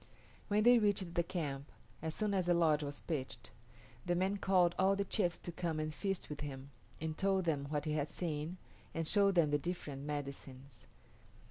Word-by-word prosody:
When 210 0 +3
they 240 +1 +7
reached 200 -5 +1
the 170 - +3
camp, 150 -6 -4 0.3
as 160 0 -3
soon 210 -2 0
as 185 -3 +1
the 175 - +4
lodge 155 -3 +4
was 145 -1 -4
pitched, 145 -6 -4 0.5
the 175 0 +1
man 190 +3 +1
called 185 -3 +3
all 190 +1 +4
the 200 0 -1
chiefs 180 -3 +1
to 175 - -6
come 170 -2 -2
and 155 0 -2
feast 195 +2 -2
with 150 - -6
him, 140 -1 -6 0.3
and 160 0 -3
told 195 0 +1
them 145 -4 0
what 150 -1 -1
he 155 - -1
had 150 -1 0
seen, 160 0 -3 0.4
and 165 -1 -1
showed 200 0 +4
them 160 -4 +4
the 145 - +3
different 150 -4 -4
medicines. 140 - -6
165 Hz, 195 wpm, -35 LUFS, 145-190 Hz, 0.5 s, they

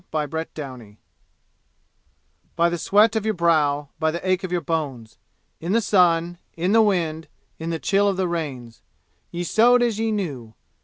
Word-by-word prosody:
Chapter 160 +1 -2
XVIII 125 -8 -9 1.6
By 170 0 +3
the 170 0 -3
sweat 210 +5 +3
of 220 - 0
your 220 -1 -1
brow; 150 -4 +1
by 160 - +1
the 170 +3 -4
ache 185 +1 +1
of 185 - -4
your 180 - +1
bones; 140 -8 -4 0.4
In 170 +4 -2
the 230 - +4
sun, 175 -5 +2 0.2
in 180 +3 0
the 225 +1 +6
wind, 165 -6 0 0.3
in 160 +1 -4
the 165 - -1
chill 200 +4 +1
of 195 -2 0
the 190 -1 0
rains, 135 -9 -5 0.5
Ye 175 +1 -4
sowed 240 +6 +4
as 230 -3 0
ye 225 0 0
knew. 140 - -4
170 Hz, 170 wpm, -23 LUFS, 155-195 Hz, 1.6 s, the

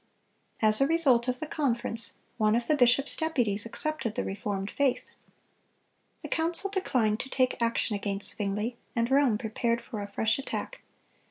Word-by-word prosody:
(257) 220 - +4
As 215 +4 +5
a 275 +3 +3
result 265 -8 +4
of 250 0 -1
the - - -3
conference, 240 - 0 0.3
one 215 0 +3
of 235 0 0
the 305 - +2
bishop's 250 +1 +3
deputies 240 -10 -1
accepted 265 -3 -1
the - - -1
reformed 195 0 -4
faith. 275 -3 0 1.1
The - - -4
council 335 +4 0
declined 240 - 0
to 265 - -5
take 255 -2 0
action 230 -1 0
against 200 0 0
Zwingle, 210 +3 -2 0.2
and 235 +1 0
Rome 270 -5 +4
prepared 230 +1 -1
for 220 -3 -7
a 200 - -5
fresh 220 +4 0
attack. - - -5
235 Hz, 165 wpm, -28 LUFS, 215-275 Hz, 1.1 s, As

